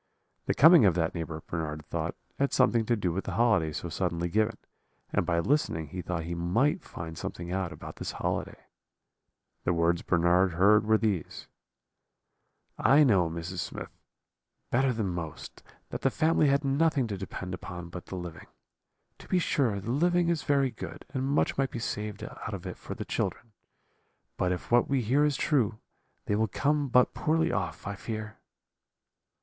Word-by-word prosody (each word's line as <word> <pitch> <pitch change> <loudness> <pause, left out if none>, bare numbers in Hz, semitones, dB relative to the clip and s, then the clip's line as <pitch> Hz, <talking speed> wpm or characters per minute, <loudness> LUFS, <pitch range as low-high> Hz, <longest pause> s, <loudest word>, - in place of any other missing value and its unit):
The - - +1
coming 160 0 +8
of 90 -4 +4
that 85 -2 0
neighbour, 80 -2 -5
Bernard 75 -2 -4
thought, - - -3 0.2
had 140 0 +2
something 120 -3 +3
to 120 - +3
do 95 -5 -1
with 95 - -3
the - - -4
holiday 105 -10 +3
so 80 - -4
suddenly 85 0 -2
given, 110 +3 +1 0.6
and - - +1
by 85 - +2
listening 85 - 0
he 90 +4 -5
thought 85 -1 -3
he 85 +1 -4
might 115 - +1
find 80 -1 -7
something 85 +2 -6
out 95 -2 -1
about - - -9
this - - -4
holiday. - - -3 1.0
"The 90 - +1
words 85 0 +2
Bernard 90 +1 +3
heard 105 +5 +4
were 110 0 +5
these: 105 -8 -2 1.3
"'I 145 +3 +6
know, 95 - +4
Mrs. 85 +2 -5
Smith, - - -5 0.8
better 130 +2 +3
than 110 -4 -1
most, 85 -3 -6 0.3
that - - -4
the 135 - +3
family 155 +2 +2
had 140 +1 +2
nothing 140 0 +2
to 105 -3 -3
depend 95 -1 -6
upon 90 -1 -7
but 90 0 -8
the - - -6
living. 85 -2 -7 0.7
To - - -13
be 185 - +2
sure, 130 - +1
the 105 +4 -4
living 175 +5 +2
is 170 -3 +1
very 140 -2 +2
good, - - -8
and 130 -1 -1
much 140 0 +1
might 135 -1 +2
be - - -6
saved 105 -2 -4
out - - -6
of - - -9
it - - -5
for - - -7
the - - -5
children, 115 - -3 0.8
but 90 - 0
if 90 +4 -4
what 120 0 +5
we 135 -3 +1
hear 135 +7 +3
is 145 -3 +1
true 120 -8 +1 0.5
they 105 - 0
will 110 +1 +2
come 145 +7 +1
but 125 0 +4
poorly 160 +1 +1
off, 90 -4 -3
I 100 - -3
fear.' 110 +1 -6
105 Hz, 180 wpm, -29 LUFS, 85-135 Hz, 1.3 s, coming